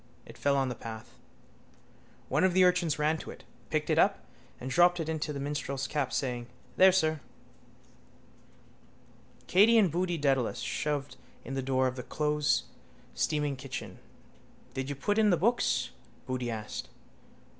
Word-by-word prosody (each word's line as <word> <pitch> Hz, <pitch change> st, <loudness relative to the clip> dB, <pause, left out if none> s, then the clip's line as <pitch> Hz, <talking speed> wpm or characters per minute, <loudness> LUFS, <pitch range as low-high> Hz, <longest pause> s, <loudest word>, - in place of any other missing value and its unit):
It -, -, -12 dB
fell 140 Hz, +3 st, +1 dB
on 135 Hz, -1 st, +1 dB
the 125 Hz, -, -2 dB
path. 110 Hz, -1 st, -9 dB, 1.1 s
One -, -, +1 dB
of 185 Hz, -1 st, +3 dB
the 185 Hz, -, +6 dB
urchins 180 Hz, -3 st, +3 dB
ran 155 Hz, +1 st, +1 dB
to -, -, -9 dB
it, -, -, -10 dB, 0.3 s
picked -, -, -1 dB
it -, -, +2 dB
up -, -, +2 dB, 0.3 s
and 125 Hz, -, -6 dB
dropped 175 Hz, +3 st, +4 dB
it 160 Hz, -, -2 dB
into 155 Hz, -1 st, -2 dB
the 140 Hz, -, -5 dB
minstrel's 140 Hz, -1 st, -3 dB
cap, 140 Hz, -3 st, -1 dB
saying: 120 Hz, -3 st, -2 dB, 0.3 s
—There, 190 Hz, 0 st, +7 dB
sir. 160 Hz, -4 st, +1 dB, 2.3 s
Katey 215 Hz, +5 st, +5 dB
and 195 Hz, -7 st, +4 dB
Boody 175 Hz, +1 st, 0 dB
Dedalus 135 Hz, -5 st, +1 dB
shoved 145 Hz, +3 st, -3 dB, 0.3 s
in 135 Hz, -, -5 dB
the 135 Hz, -, -1 dB
door 130 Hz, 0 st, +1 dB
of 130 Hz, 0 st, -1 dB
the -, -, -3 dB
closesteaming 150 Hz, 0 st, -2 dB
kitchen. 130 Hz, -1 st, -7 dB, 0.7 s
—Did 135 Hz, +1 st, -3 dB
you 145 Hz, -, -3 dB
put 205 Hz, +10 st, 0 dB
in 215 Hz, -1 st, +5 dB
the 175 Hz, -, +4 dB
books? 235 Hz, +8 st, +1 dB, 0.3 s
Boody 130 Hz, -2 st, -3 dB
asked. 110 Hz, -2 st, -5 dB
145 Hz, 155 wpm, -30 LUFS, 130-175 Hz, 2.3 s, There